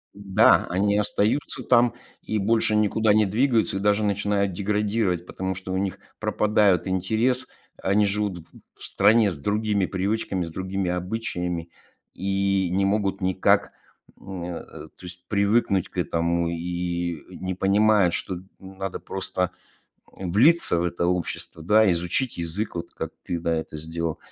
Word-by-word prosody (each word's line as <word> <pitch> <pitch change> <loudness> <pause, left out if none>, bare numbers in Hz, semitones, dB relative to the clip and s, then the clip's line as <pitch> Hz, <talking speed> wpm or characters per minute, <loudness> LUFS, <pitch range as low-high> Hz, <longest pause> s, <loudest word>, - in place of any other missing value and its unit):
М-да, 100 -1 +4
они 100 +3 +1
остаются 105 +6 0
там 120 0 +4 0.3
и 110 - -2
больше 110 +1 +2
никуда 105 0 +3
не 110 0 +4
двигаются, 110 0 +1
и - - -2
даже 105 +1 +2
начинают 100 -1 0
деградировать, 100 -2 0
потому 95 +1 -4
что 95 0 -6
у - - 0
них 95 -1 -2 0.2
пропадают 105 -4 +2
интерес, 110 +8 0 0.4
они 105 +2 +3
живут 100 -2 -1
в - - -12 0.3
в - - -24
в - - -9
стране 105 +2 +4
с 85 - -7
другими 105 +4 0
привычками, 95 -1 -2
с - - -7
другими 95 +2 -3
обычаями 90 -2 -3 0.4
и 95 -1 0
не 95 +2 +1
могут 100 -1 0
никак, 95 0 +2 0.5
м, 95 -2 -7
э, 85 -1 -5 0.3
то - - -16
есть 90 0 -10
привыкнуть 100 -1 +1
к - - -15
этому 85 0 0
и 85 -1 -3
не 95 0 -5
понимают, 100 -1 +3
что 95 - -2
н 90 - -9 0.2
надо 95 0 -6
просто, 90 -1 -3 0.7
м, 95 -2 -4
влиться 140 - +5
в - - 0
это 85 0 -1
общество, 90 -2 -3
да, 105 +4 +4
изучить 90 +9 -1
язык, 85 +5 -3
вот 85 0 -6
как - - -5
ты, 85 -1 -3
да, 85 0 0
это 80 -1 -5
сделал. 80 0 -4
95 Hz, 155 wpm, -24 LUFS, 90-105 Hz, 0.7 s, влиться